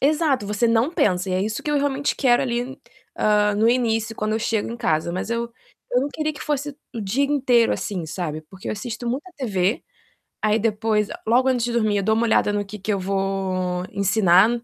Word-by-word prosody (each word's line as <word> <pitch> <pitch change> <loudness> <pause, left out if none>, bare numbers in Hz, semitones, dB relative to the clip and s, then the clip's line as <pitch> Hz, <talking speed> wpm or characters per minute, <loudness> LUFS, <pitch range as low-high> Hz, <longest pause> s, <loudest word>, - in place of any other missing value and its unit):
exato, 290 -6 +2
você 210 +3 +1
não 230 +6 +2
pensa, 185 - +1
e - - -1
é 185 - +1
isso 215 +1 -3
que 295 - -2
eu 295 - +2
realmente 285 0 0
quero, 245 -2 +3
ali, 245 +1 -3 0.4
hã, 210 -1 +3
no 220 +2 +2
início, 225 -2 +1
quando 215 0 -2
eu - - +1
chego 220 0 -1
em 235 - -5
casa. 165 -7 0
Mas 185 +5 -3
eu 235 0 -2 0.4
eu 250 - +3
não 285 - -1
queria 310 0 -1
que 290 - -12
fosse 290 -1 -2 0.2
o 230 - -4
dia 225 +8 +1
inteiro, 255 -5 +3
assim, 185 -5 -3
sabe. 155 -1 -4
Porque 190 0 -8
eu - - -1
assisto 240 +2 -5
muita 285 +9 -3
TV, 200 -5 0 0.6
aí 215 +1 +3
depois, 215 -1 0 0.2
logo 255 +3 +4
antes 245 -2 +1
de 240 - -2
dormir, 215 -3 +2
eu 200 - 0
dou 220 +2 +2
uma 230 - +1
olhada 220 -2 +2
no 205 0 0
que 210 +1 -9
que 210 +3 -1
eu 195 - -1
vou 185 -2 -1
ensinar 195 0 +4
220 Hz, 215 wpm, -23 LUFS, 195-250 Hz, 0.6 s, logo